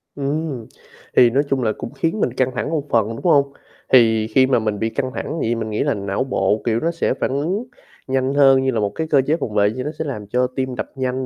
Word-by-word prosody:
Ừm, 140 -3 -3 0.5
thì 125 - +7
nói 135 +5 +2
chung 135 -2 0
là 110 - +1
cũng - - -6
khiến 165 +6 -1
mình 125 - 0
căng 130 0 0
thẳng - - -2
một 155 -3 -2
phần, 110 -3 +2
đúng 115 - -6
không? 140 -5 +3 0.4
Thì 110 -3 +5
khi 130 +4 +3
mà 130 -3 +3
mình 105 -2 -2
bị 110 - 0
căng 130 +2 -3
thẳng - - -4
vậy - - -1
thì 120 - +1
mình 110 -1 -4
nghĩ 105 - -1
là - - +1
não 100 +2 -2
bộ, 105 -5 0
kiểu, 115 -1 +1
nó 165 +5 0
sẽ 165 -5 0
phản - - -2
ứng 170 - -1 0.4
nhanh 130 0 0
hơn 135 -2 +5
như 130 - +1
là 115 - -1
một 105 -1 0
cái 160 +9 -4
cơ 145 -3 +4
chế 155 - +3
phòng 105 - -4
vệ, 105 0 +3
như 125 +3 -5
nó 150 - -3
sẽ 160 - -2
làm 105 -8 -5
cho 125 +4 +1
tim 130 -1 -2
đập - - -5
nhanh 130 0 -2
130 Hz, 270 wpm, -20 LUFS, 110-140 Hz, 0.5 s, thì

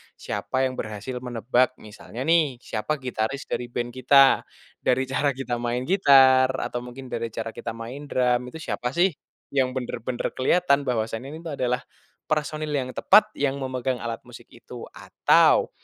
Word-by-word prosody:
siapa 130 +1 -2
yang 130 - -6
berhasil 105 +4 -5
menebak. 125 +1 0
Misalnya 110 +3 -8
nih 160 -5 +3
siapa 110 +7 -2
gitaris 125 +2 -3
dari 120 0 -2
band 120 0 -3
kita, 135 +2 +5 0.4
dari 130 +1 +1
cara 140 +1 +1
kita 120 -2 -3
main 120 +1 -2
gitar 135 -8 +6
atau 120 - -3
mungkin 125 +2 -9
dari 115 0 -2
cara 115 - -4
kita 115 - -5
main 125 +6 -8
drum 125 -1 +1
itu 160 - -9
siapa 125 - -2
sih 185 +2 +4 0.4
yang 130 -2 +2
bener-bener 120 -1 -3
keliatan 140 +1 +3
bahwasanya 115 +1 -2
ini 155 - -8
tuh 165 -3 -5
adalah 125 0 0 0.5
personil 155 0 -1
yang 130 -2 -1
tepat 210 +2 +5
yang 140 -1 0
memegang 130 -1 -2
alat 115 -1 -4
musik - - -13
itu, - - -11
atau - - +3
130 Hz, 160 wpm, -25 LUFS, 120-140 Hz, 0.5 s, gitar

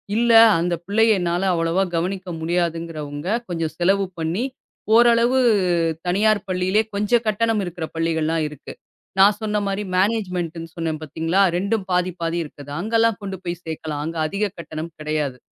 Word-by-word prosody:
இல்ல, 235 +1 +3 0.3
அந்த 175 +1 0
பிள்ளைய 215 0 +3
என்னால 175 +1 -1
அவ்ளோவா 165 +3 +1
கவனிக்க 185 +2 -3
முடியாதுங்கிறவங்க, 165 -3 -3 0.2
கொஞ்சம் 165 -2 -2
செலவு 195 +3 +2
பண்ணி 170 +10 -1 0.5
ஓரளவு 235 +2 +5 0.7
தனியார் 205 +3 +2
பள்ளிலே, 185 +3 +1
கொஞ்சம் 210 +4 +1
கட்டணம் 220 +1 +1
இருக்குற 175 -2 -5
பள்ளிகள்லாம் 160 -1 0
இருக்கு. 150 -2 -10 0.5
நான் 205 +1 +6
சொன்ன 210 -1 0
மாரி, 195 +1 -2
மேனேஜ்மெண்ட்னு 180 -5 -1
சொன்னேன் 160 -2 -3
பாத்தீங்களா, 165 +5 0 0.2
2ம் 200 +1 -1
பாதி, 180 0 +1
பாதி 165 +1 -1
இருக்குது. 145 -1 -11
அங்கலாம் 225 +2 +1
கொண்டு 195 -1 -5
போய் 175 0 -4
சேக்கலாம். 155 -2 -4
அங்க 165 +1 -5
அதிகம் 200 +4 -2
கட்டணம் 160 0 -6
கெடையாது. 150 -4 -2
180 Hz, 140 wpm, -22 LUFS, 165-205 Hz, 0.7 s, நான்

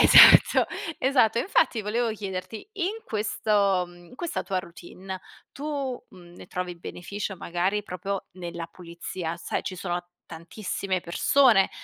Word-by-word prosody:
esatto, - - +9 0.3
esatto. 250 -4 +3
Infatti 260 - +2
volevo 230 +3 0
chiederti 200 +1 -6
in 405 +4 -2
questo 205 -3 +1
mhmm, 175 0 -16
in 250 - -15
questa 340 +4 -3
tua 190 -2 -1
routine 185 +2 -9 0.3
tu, 280 -3 -3
mhmm, 175 -2 -15
ne - - -11
trovi 180 0 -4
beneficio 195 +3 -5
magari 180 +4 -1
proprio, 195 0 -4
nella 170 -2 -6
pulizia? 170 0 -6
Sai, 175 - -3
ci 185 - -5
sono 175 -1 -2 0.3
tantissime 185 +3 -3
persone 205 +4 +4
195 Hz, 130 wpm, -26 LUFS, 175-220 Hz, 0.3 s, esatto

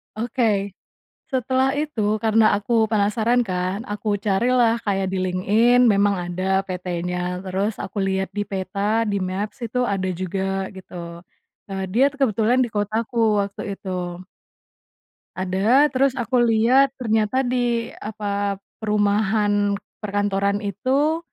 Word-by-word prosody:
Oke, 215 -3 0 0.6
setelah 260 +1 +1
itu 295 -7 -2 0.2
karena 220 -1 +4
aku 220 +2 +1
penasaran 220 +3 +2
kan 185 +1 -2
aku 210 -2 -2
carilah 235 +3 +3
kayak 195 -2 0
di 190 - -2
LinkedIn 210 +7 +3
memang 200 0 +3
ada 185 +2 -1
PTnya 180 0 -3
terus 195 +3 -1
aku 200 +1 -6
lihat 190 0 0
di 205 0 -3
peta 200 +3 -1
di-Maps 195 +1 -3
itu 250 +3 -1
ada 195 -5 -1
juga 195 +1 -2
gitu, 190 -1 -13 0.7
eee, 195 -1 -4
dia 245 +7 +3
kebetulan 245 -2 +2
di 240 - -2
kotaku 220 0 +1
waktu 200 0 -5
itu. 195 -1 -8 1.5
Ada 200 +10 +3
terus 265 0 +2
aku 245 +1 0
lihat 240 +4 +4
ternyata 225 +1 +1
di 245 -2 0
apa 205 -1 -2 0.2
perumahan 205 -1 +1 0.2
perkantoran 205 0 -1
itu 265 - 0
205 Hz, 120 wpm, -22 LUFS, 195-235 Hz, 1.5 s, karena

